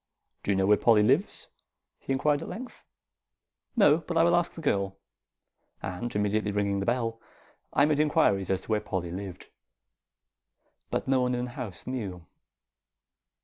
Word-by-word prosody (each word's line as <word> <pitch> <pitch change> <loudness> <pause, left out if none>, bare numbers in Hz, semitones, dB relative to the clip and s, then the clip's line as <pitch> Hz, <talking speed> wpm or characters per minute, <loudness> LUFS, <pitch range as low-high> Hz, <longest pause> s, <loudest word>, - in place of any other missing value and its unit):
"Do - - -6
you 100 - +3
know 95 0 +2
where 105 +1 +5
Polly 110 -3 +5
lives?" 105 - +1 0.5
he - - -6
inquired 145 +2 +2
at - - -6
length. 250 +3 -8 0.9
"No; 170 -9 +5
but 165 +1 -4
I 165 - +6
will 170 +1 +4
ask 175 0 +1
the - - -8
girl." 100 -8 0 0.9
And 95 +6 -4
immediately 105 0 +1
ringing 100 -1 0
the 100 - -3
bell, 115 -2 -1 0.5
I 140 - +4
made 150 -1 +1
inquiries 100 - +2
as 95 -1 0
to - - -17
where 105 -1 +2
Polly 95 -4 -3
lived; 95 0 -7 1.4
but - - -2
no 130 -1 +3
one 125 0 +1
in 125 0 -2
the 125 - -8
house 120 -8 -7
knew. 100 -10 -5
115 Hz, 165 wpm, -28 LUFS, 100-140 Hz, 1.4 s, I